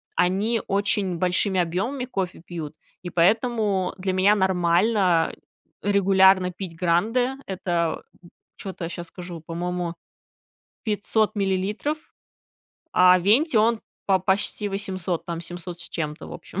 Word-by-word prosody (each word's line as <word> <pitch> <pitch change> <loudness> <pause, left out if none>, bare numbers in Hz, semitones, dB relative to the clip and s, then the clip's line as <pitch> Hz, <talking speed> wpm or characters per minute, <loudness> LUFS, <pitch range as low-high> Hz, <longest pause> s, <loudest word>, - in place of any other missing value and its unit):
они 205 +5 +1
очень 195 -2 +1
большими 185 +2 +1
объёмами 200 +11 -1
кофе 190 -9 -4
пьют. 165 -4 -6 0.3
И 175 - -4
поэтому 205 +1 +2
для 190 0 -2
меня 195 +3 +4
нормально 185 -1 +2 0.5
регулярно 190 -2 +4
пить 180 -2 -7
гранды. 220 +10 +1
Это, 175 -3 -1 0.2
м, 175 - -15 0.3
чё-то 190 -3 -6
я - - -4
щас 175 0 -6
скажу, 175 -2 -8
по-моему, 175 0 -3 0.9
500 215 0 0
миллилитров, 200 +9 -1 0.9
а 180 0 +6
венти, 230 - +3
он 225 +1 +3 0.3
по 195 -1 +4
почти 195 +2 0
800, 190 -3 -3
там 170 -1 -4
700 175 0 -8
с - - -5
чем-то, 150 -2 -4
в - - -10
общем. - - -7
190 Hz, 125 wpm, -24 LUFS, 175-205 Hz, 0.9 s, а